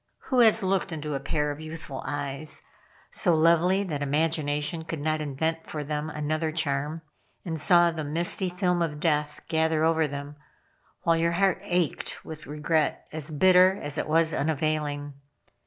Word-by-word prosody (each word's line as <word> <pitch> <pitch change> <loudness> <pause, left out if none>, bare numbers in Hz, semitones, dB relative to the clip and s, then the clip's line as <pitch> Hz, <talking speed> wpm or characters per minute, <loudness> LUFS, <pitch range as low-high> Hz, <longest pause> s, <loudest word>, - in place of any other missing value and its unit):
Who 255 - +4
has 225 -2 +6
looked 190 0 0
into 150 -2 -4
a 135 - -1
pair 150 +2 -1
of 145 - -7
youthful 155 -3 -6
eyes, 145 +1 -3 0.5
so 175 - +2
lovely 170 +4 +3
that 155 -7 -4
imagination 150 +1 0
could 160 -1 -5
not 155 +1 -1
invent 160 +3 -2
for 150 -1 -4
them 150 +1 -3
another 155 +1 -2
charm, 150 0 -2 0.4
and 160 -3 -2
saw 175 0 +5
the 160 -2 -4
misty 170 +5 0
film 180 -1 0
of 150 -3 -2
death 150 -2 0
gather 160 -1 +1
over 160 -1 +3
them, 145 +1 -7 0.7
while 165 -1 +3
your 170 +1 +1
heart 190 +1 +2
ached 175 -4 -2
with 155 -1 -8
regret 150 +1 0
as 155 0 -3
bitter 185 +4 +5
as 145 +1 -2
it - - -3
was 160 +1 +3
unavailing. 145 -1 -1
155 Hz, 160 wpm, -26 LUFS, 150-170 Hz, 0.7 s, has